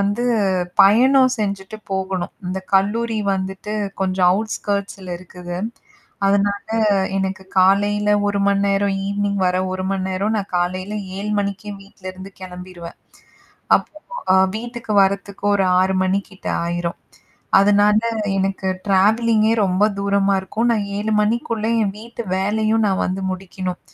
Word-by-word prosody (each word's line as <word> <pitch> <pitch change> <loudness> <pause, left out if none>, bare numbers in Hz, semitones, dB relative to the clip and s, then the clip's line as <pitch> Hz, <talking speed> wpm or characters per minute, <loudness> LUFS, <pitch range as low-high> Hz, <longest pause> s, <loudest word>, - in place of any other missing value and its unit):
வந்து 205 +4 0 0.6
பயணம் 255 +5 +5
செஞ்சுட்டு 200 0 -3
போகணும். 190 -1 -3
இந்த 190 +1 -3
கல்லூரி 220 +3 +1 0.2
வந்துட்டு 190 +2 -4 0.3
கொஞ்சம் 185 -1 +2
அவுட்ஸ்கர்ட்ஸி 200 -1 -2
-ல 180 -1 -4
இருக்குது. 180 -1 -8 0.7
அதனால, 200 0 +1 0.5
எனக்கு 190 0 -2 0.2
காலையில் 205 +2 +3 0.2
1 205 - 0
மணி 200 0 +2
நேரம் 200 0 +1
ஈவினிங் 200 0 -1
வர 180 0 +1 0.2
1 185 0 -3
மணி 190 -1 -1
நேரம் 200 +4 -1
நான் 200 -1 -6
காலையில் 185 +4 -2 0.2
7 210 +1 -4
மணிக்கே 200 +1 -3
வீட்லருந்து 185 -1 -10
கெளம்பிறுவேன். 180 -2 -9 0.8
அப்போ 305 - -8 0.6
வீட்டுக்கு 235 -1 -5
வர்றதுக்கு 200 +1 -2
ஒரு 195 - +2 0.2
6 190 +1 +1
மணி 185 +1 +2
கிட்ட 190 - -8 0.2
ஆயிரும். 170 0 -3 0.6
அதனால் 205 +2 +4 0.4
எனக்கு 195 0 -1 0.2
ட்ராவலிங் 215 +3 +3
-கே 225 - +3
ரொம்ப 185 +2 +1 0.2
தூரமா 200 0 +2
இருக்கும். 220 +5 -1
நான் 215 -3 0
7 215 +1 -2
மணிக்குள்ள 225 0 -1 0.2
என் 195 -2 0
வீட்டு 235 +1 -7 0.2
வேலையும் 215 +3 +1
நான் 190 - 0
வந்து 185 +1 -2
முடிக்கணும் 185 -1 -5
200 Hz, 130 wpm, -20 LUFS, 190-210 Hz, 0.8 s, பயணம்